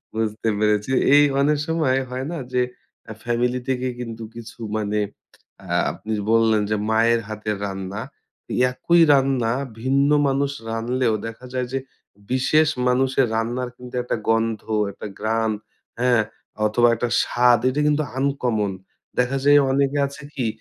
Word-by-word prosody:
বুঝতে 110 0 -1
পেরেছি। 105 +3 +1 0.2
এই 145 - +7 0.2
অনেক 150 +1 +3
সময়, 155 -5 +1
হয় 130 +1 -4
না? 170 - -4 0.2
যে 125 - +3 0.5
আ - - -5
ফ্যামিলি 120 +1 0
থেকে 130 0 0
কিন্তু 115 -2 -6
কিছু 115 0 -10 0.2
মানে 105 0 -1 0.7
আ - - -12 0.2
আপনি 110 0 -6 0.2
বললেন 110 -2 +4
যে 105 - +1
মায়ের 115 +1 +3
হাতের 105 -1 -3
রান্না। 95 +2 -5 0.7
একই 170 +6 +3
রান্না 130 -4 +2 0.3
ভিন্ন 140 +2 +2 0.2
মানুষ 140 +1 +1 0.2
রানলেও 115 +1 0
দেখা 115 +3 -9
যায় 125 -1 -1
যে 135 - +1 0.5
বিশেষ 150 +4 +3 0.2
মানুষের 130 +1 +2
রান্নার 120 +2 -1
কিন্তু 125 0 -10
একটা 125 - -1
গন্ধ, 115 -1 +1 0.3
একটা 105 - -8
ঘ্রান, 110 +1 0 0.5
হ্যাঁ? 120 -3 +3 0.4
অথবা 120 +3 +3
একটা 120 +2 -2
স্বাদ, 120 -1 +4
এটা 145 +3 -1
কিন্তু 150 +1 +2
আনকমন। 125 -7 0 0.5
দেখা 125 +2 +1
যায় 145 0 +7
অনেকে 140 +1 +1
আছে 140 0 -11
কি, 125 -5 -1
125 Hz, 145 wpm, -22 LUFS, 110-135 Hz, 0.7 s, এই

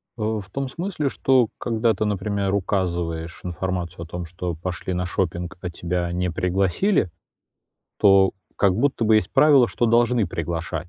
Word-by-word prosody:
А, 110 -1 -1
в 95 -2 -10
том 135 +3 -3
смысле, 165 -1 -2
что 130 -3 +3
когда 115 -1 +1
ты, 110 +2 -2
например, 100 -1 -1
указываешь 85 -4 -2
информацию 90 -1 -4
о - - -10
том, 90 +1 -5
что 85 +1 -5
пошли 90 +2 -4
на 90 0 -1
шопинг, 90 0 -2
а 90 - -3
тебя 85 0 -2
не 90 +1 -1
пригласили, 95 - +1 0.9
то 95 -1 +5 0.2
как 100 -2 +3
будто 120 +2 +1
бы 110 0 +5
есть 95 -4 0
правило, 145 -5 +6
что 120 - 0
должны 120 -1 +3
приглашать. 85 0 -4
95 Hz, 160 wpm, -23 LUFS, 85-110 Hz, 0.9 s, правило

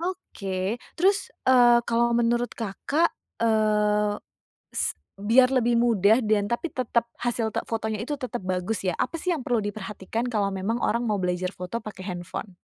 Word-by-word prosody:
Oke. 210 - -3 0.2
Terus, 390 +3 +2 0.2
eee, 245 -2 +6
kalau 235 0 +2
menurut 240 +1 +1
Kakak, 275 +10 0 0.3
eee, 210 -2 +2 0.5
s - - -1 0.3
biar 245 +5 +5
lebih 240 -2 +2
mudah 230 0 +4
dan 210 -1 +2
tapi 235 +9 -2
tetep 250 -2 0 0.2
hasil 235 -2 -1
te - - -1
fotonya 220 -1 -2
itu 255 +7 -3
tetap 255 -4 -4
bagus 185 +2 -2
ya. 180 - +1
Apa 330 - -2
sih 360 +1 0
yang 285 - -5
perlu 240 -2 +1
diperhatikan 205 +1 -4
kalau 210 -3 +1
memang 195 +4 -2
orang 235 +1 +1
mau 210 -3 0
belajar 180 0 -1
foto 200 +5 -5
pake 200 -3 -8
handphone? 180 +1 -6
225 Hz, 160 wpm, -26 LUFS, 200-240 Hz, 0.5 s, eee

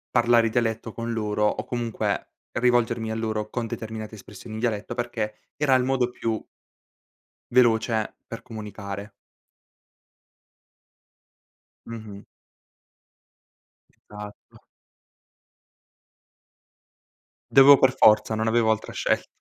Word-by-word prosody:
parlare 120 -1 +4
dialetto 115 -1 -1
con 115 0 -4
loro 105 -2 -1
o - - -2
comunque 120 -2 -3 0.2
rivolgermi 120 -2 +1
a 110 - -2
loro 110 -1 -2
con 120 0 -3
determinate 110 -1 -6
espressioni 105 +1 -11
in 110 - -5
dialetto 110 -2 -2
perché 120 -3 -3 0.2
era 145 -2 +2
il 130 - +4
modo 130 -1 +1
più 115 -3 -2 1.1
veloce 115 -3 +2
per 115 - -7
comunicare. 105 -3 -7 2.7
Mh-mh. 110 -3 -9 1.7
Esatto. 105 0 -13 2.9
Dovevo 135 +1 +9
per 130 -1 +4
forza, 110 +1 +5
non 110 +1 -1
avevo 110 0 +3
altra 110 - -3
scelt - - 0
115 Hz, 95 wpm, -25 LUFS, 110-120 Hz, 2.9 s, Dovevo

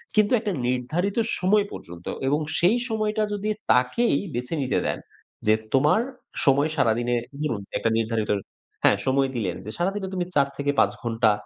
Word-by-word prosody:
কিন্তু 215 +1 +4
একটা 210 -2 -2 0.2
নির্ধারিত 155 - -1 0.2
সময় 200 +3 +3
পর্যন্ত।" 85 0 -10 0.2
এবং 145 +3 +2 0.2
সেই 190 +8 +4
সময়টা 215 0 0
যদি 205 +1 -2 0.2
তাকেই 125 - +3 0.2
বেছে 125 +6 -3
নিতে 130 - +1
দেন। - - -2 0.5
যে, 110 - +6 0.2
"তোমার 150 - +4 0.4
সময় 140 +3 +4
সারাদিনে।" 120 -1 +2 0.3
ধরুন 115 -10 -1 0.2
একটা 115 - +1
নির্ধারিত 110 -1 -1 0.5
হ্যাঁ, 100 - +5
সময় 135 0 +3
দিলেন 95 -6 -1
যে, 110 - -5
"সারাদিনে 190 +2 -1
তুমি 180 -1 -1
৪-৫ 140 0 +2
ঘন্টা 115 -2 +3
140 Hz, 145 wpm, -25 LUFS, 120-195 Hz, 0.5 s, যে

